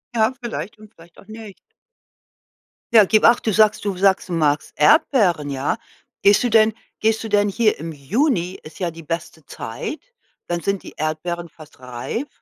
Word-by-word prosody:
Ja, 220 Hz, +3 st, +2 dB
vielleicht 225 Hz, -4 st, -6 dB
und 215 Hz, +1 st, -16 dB
vielleicht 170 Hz, +1 st, -19 dB
auch 200 Hz, -, -18 dB
nicht. 215 Hz, -3 st, -11 dB, 1.4 s
Ja, 220 Hz, -2 st, +8 dB
gib 215 Hz, +3 st, +3 dB
acht, 235 Hz, 0 st, +4 dB
du 220 Hz, -, +2 dB
sagst 215 Hz, +1 st, +3 dB
du 195 Hz, -3 st, -2 dB
sagst 190 Hz, -1 st, +2 dB
du -, -, -3 dB
magst 150 Hz, -2 st, 0 dB
Erdbeeren, 200 Hz, -, +3 dB
ja. 135 Hz, +7 st, -1 dB, 0.5 s
Gehst 200 Hz, 0 st, +5 dB
du 245 Hz, -, +1 dB
denn 220 Hz, -1 st, +4 dB, 0.3 s
gehst 220 Hz, 0 st, +1 dB
du 225 Hz, -, -5 dB
denn 205 Hz, -1 st, +2 dB
hier 215 Hz, +1 st, +1 dB
im 165 Hz, +1 st, -6 dB
Juni, 185 Hz, -, -1 dB
ist 155 Hz, -, -13 dB
ja 175 Hz, -2 st, -2 dB
die 165 Hz, 0 st, -12 dB
beste 160 Hz, -2 st, -6 dB
Zeit, 115 Hz, -, -6 dB, 0.5 s
dann 175 Hz, -1 st, -2 dB
sind 200 Hz, -1 st, -2 dB
die -, -, -11 dB
Erdbeeren 165 Hz, +2 st, -3 dB
fast 155 Hz, -4 st, -16 dB
reif 125 Hz, -, -5 dB
195 Hz, 180 wpm, -21 LUFS, 165-220 Hz, 1.4 s, Ja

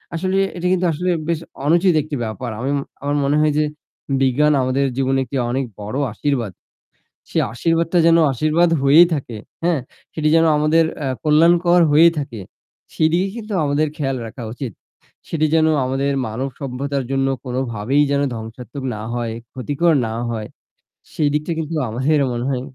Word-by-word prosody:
আসলে 185 Hz, +3 st, -1 dB, 0.2 s
এটা 180 Hz, +1 st, -1 dB
কিন্তু 180 Hz, 0 st, +1 dB
আসলে 180 Hz, +4 st, -1 dB, 0.2 s
বেশ 165 Hz, -2 st, 0 dB, 0.3 s
অনুচিত 175 Hz, +3 st, +4 dB
একটি 150 Hz, -1 st, -5 dB
ব্যাপার 120 Hz, +3 st, -5 dB
আমি 130 Hz, -, -2 dB
ম -, -, 0 dB, 0.2 s
আমার 145 Hz, +1 st, -1 dB
মনে 140 Hz, +2 st, +1 dB
হয় 155 Hz, -1 st, +2 dB
যে 155 Hz, -, +3 dB, 0.6 s
বিজ্ঞান 145 Hz, +3 st, +3 dB
আমাদের 130 Hz, +2 st, +1 dB
জীবনে 135 Hz, 0 st, +1 dB
একটি 135 Hz, +2 st, -4 dB
অনেক 130 Hz, +2 st, -1 dB
বড়ো 105 Hz, +7 st, -4 dB
আশীর্বাদ। 120 Hz, -5 st, -1 dB, 0.8 s
সে -, -, -1 dB
আশীর্বাদটা 165 Hz, +6 st, +1 dB
যেন 165 Hz, -, +6 dB, 0.2 s
আশীর্বাদ 155 Hz, +6 st, +2 dB
হয়েই 155 Hz, +5 st, +7 dB
থাকে, 130 Hz, -6 st, -5 dB, 0.3 s
হ্যাঁ, 170 Hz, -4 st, +2 dB, 0.3 s
সেটি 155 Hz, -1 st, 0 dB
যেন 165 Hz, -, +5 dB
আমাদের 155 Hz, +2 st, +3 dB, 0.2 s
আ -, -, 0 dB, 0.2 s
কল্যাণকর 170 Hz, +3 st, +4 dB
হয়েই 165 Hz, +3 st, +6 dB
থাকে, 120 Hz, -7 st, -5 dB, 0.5 s
সেদিকে 170 Hz, +5 st, +2 dB
কিন্তু 220 Hz, -2 st, -7 dB
আমাদের 145 Hz, +2 st, +1 dB
খেয়াল 135 Hz, -3 st, -1 dB
রাখা 120 Hz, +2 st, -9 dB
উচিত, 125 Hz, -1 st, -6 dB, 0.6 s
সেটি 155 Hz, -1 st, +1 dB
যেন 160 Hz, -1 st, +4 dB, 0.2 s
আমাদের 135 Hz, +2 st, 0 dB
মানবসভ্যতার 135 Hz, +3 st, -4 dB
জন্য 135 Hz, 0 st, +1 dB, 0.2 s
কোনোভাবেই 125 Hz, +1 st, 0 dB
যেন 140 Hz, 0 st, +2 dB
ধ্বংসাত্মক 115 Hz, +4 st, -8 dB
না -, -, -7 dB
হয়, 115 Hz, -2 st, -3 dB, 0.2 s
ক্ষতিকর 145 Hz, +6 st, +1 dB
না 110 Hz, -, -4 dB, 0.2 s
হয়, 110 Hz, -2 st, -4 dB, 0.7 s
সেই 150 Hz, -2 st, +1 dB
দিকটা 150 Hz, +3 st, -1 dB
কিন্তু 160 Hz, +1 st, -4 dB
আমাদের 130 Hz, +7 st, +1 dB
মনে 120 Hz, +1 st, -3 dB
হয় 130 Hz, -2 st, -1 dB
145 Hz, 160 wpm, -20 LUFS, 130-160 Hz, 0.8 s, হয়েই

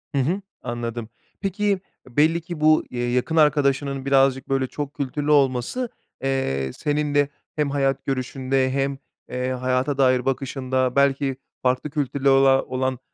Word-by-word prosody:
Hı -, -, +3 dB
hı, 180 Hz, +9 st, 0 dB, 0.2 s
anladım. 120 Hz, -1 st, -4 dB, 0.3 s
Peki 200 Hz, 0 st, 0 dB, 0.3 s
e, 120 Hz, -, -21 dB
belli 165 Hz, +3 st, +4 dB
ki 170 Hz, -2 st, -7 dB
bu, 155 Hz, 0 st, +5 dB
eee, 120 Hz, -1 st, -2 dB
yakın 125 Hz, +6 st, 0 dB
arkadaşının 140 Hz, -3 st, +2 dB
birazcık, 135 Hz, -1 st, +3 dB
böyle, 135 Hz, -1 st, +1 dB
çok 145 Hz, +1 st, -5 dB
kültürlü 145 Hz, +1 st, -2 dB
olması, 140 Hz, -, +2 dB, 0.3 s
eee, 70 Hz, -, -1 dB
senin 150 Hz, -1 st, -1 dB
de 145 Hz, 0 st, +3 dB, 0.3 s
hem 150 Hz, -2 st, 0 dB
hayat 135 Hz, -1 st, 0 dB
görüşünde 130 Hz, 0 st, 0 dB
hem, 135 Hz, 0 st, 0 dB, 0.3 s
eee, 125 Hz, +1 st, -2 dB
hayata 130 Hz, +2 st, 0 dB
dair 130 Hz, -2 st, +3 dB
bakışında, 130 Hz, -1 st, -1 dB
belki 140 Hz, -1 st, +2 dB, 0.3 s
farklı 130 Hz, +3 st, +1 dB
kültürlere 140 Hz, -2 st, 0 dB
ola 135 Hz, 0 st, +5 dB
olan, 130 Hz, 0 st, -2 dB
135 Hz, 145 wpm, -23 LUFS, 130-145 Hz, 0.3 s, bu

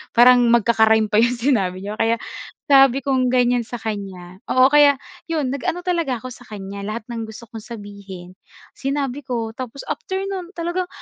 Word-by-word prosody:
parang 245 Hz, +1 st, +7 dB
magkaka-rhyme 220 Hz, -1 st, +4 dB
pa 210 Hz, -, +4 dB
'yong 240 Hz, +1 st, +2 dB
sinabi 230 Hz, -8 st, +1 dB
niya 210 Hz, +1 st, -5 dB
kaya 230 Hz, +1 st, +2 dB, 0.6 s
sabi 270 Hz, -1 st, +6 dB
kong 260 Hz, -2 st, +1 dB
gan'yan 245 Hz, -1 st, +3 dB
sa -, -, -6 dB
kanya 190 Hz, -4 st, -6 dB
oo, 255 Hz, +1 st, +5 dB
kaya 290 Hz, -1 st, +6 dB, 0.3 s
'yon 305 Hz, -6 st, -1 dB
nag-ano 325 Hz, +6 st, -3 dB
talaga 335 Hz, -8 st, 0 dB
ako 255 Hz, -, -7 dB
sa 245 Hz, -, -16 dB
kan'ya 200 Hz, -1 st, -7 dB
lahat 215 Hz, +1 st, -4 dB
ng 225 Hz, -1 st, -4 dB
gusto 220 Hz, +2 st, -11 dB
kong 225 Hz, -, -7 dB
sabihin 200 Hz, -5 st, -10 dB, 0.5 s
sinabi 275 Hz, -1 st, -2 dB
ko 230 Hz, -4 st, -3 dB
tapos 255 Hz, +1 st, -6 dB
after 380 Hz, 0 st, -3 dB
nun 370 Hz, -3 st, -5 dB
talagang, 345 Hz, +2 st, -2 dB
240 Hz, 170 wpm, -21 LUFS, 215-275 Hz, 0.6 s, parang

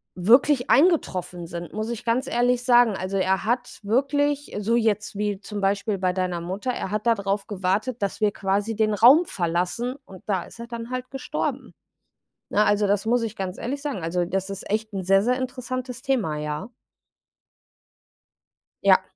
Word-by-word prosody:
wirklich 245 Hz, +8 st, +4 dB
eingetroffen 185 Hz, -, +2 dB
sind, 170 Hz, 0 st, -7 dB
muss 215 Hz, +1 st, -3 dB
ich 235 Hz, -2 st, -5 dB
ganz 245 Hz, +3 st, +1 dB
ehrlich 245 Hz, -1 st, +1 dB
sagen, 245 Hz, -2 st, +5 dB
also, 190 Hz, +1 st, -3 dB
er 190 Hz, -1 st, +1 dB
hat 245 Hz, +2 st, -1 dB
wirklich 285 Hz, +6 st, 0 dB
so 220 Hz, +3 st, +1 dB
jetzt 215 Hz, -3 st, 0 dB
wie 205 Hz, -1 st, -1 dB
zum 205 Hz, +1 st, -6 dB
Beispiel 200 Hz, +1 st, 0 dB
bei 185 Hz, -1 st, +1 dB
deiner 180 Hz, -2 st, -1 dB
Mutter, 190 Hz, +8 st, -3 dB
er 240 Hz, -, -4 dB
hat 210 Hz, +1 st, -2 dB
da 235 Hz, -, +5 dB
darauf 200 Hz, -1 st, -2 dB
gewartet, 205 Hz, +5 st, -1 dB
dass 200 Hz, +1 st, -2 dB
wir 210 Hz, -1 st, +3 dB
quasi 200 Hz, +3 st, -1 dB
den 215 Hz, 0 st, +2 dB
Raum 260 Hz, -, +7 dB
verlassen. 180 Hz, -, -1 dB
Und 190 Hz, -2 st, -13 dB
da 190 Hz, -4 st, 0 dB
ist -, -, -15 dB
er 235 Hz, -, -7 dB
dann 235 Hz, 0 st, -6 dB
halt 255 Hz, 0 st, -4 dB
gestorben. 270 Hz, -, -4 dB, 0.8 s
Ne, 210 Hz, -, +3 dB
also, 205 Hz, 0 st, +2 dB
das 205 Hz, +2 st, +1 dB
muss 235 Hz, +1 st, +2 dB
ich 220 Hz, -1 st, -4 dB
ganz 190 Hz, -1 st, -4 dB
ehrlich 275 Hz, +4 st, -4 dB
sagen. 280 Hz, -, -4 dB
Also, 175 Hz, +2 st, 0 dB
das 190 Hz, +2 st, -2 dB
ist 195 Hz, -, -7 dB
echt 215 Hz, +1 st, -2 dB
'n 190 Hz, -1 st, -3 dB
sehr, 195 Hz, +2 st, +4 dB
sehr 250 Hz, +3 st, +1 dB
interessantes 255 Hz, 0 st, -5 dB
Thema, 230 Hz, -, 0 dB
ja. 150 Hz, +7 st, -4 dB, 2.1 s
Ja. -, -, +6 dB
215 Hz, 180 wpm, -24 LUFS, 190-245 Hz, 2.1 s, Raum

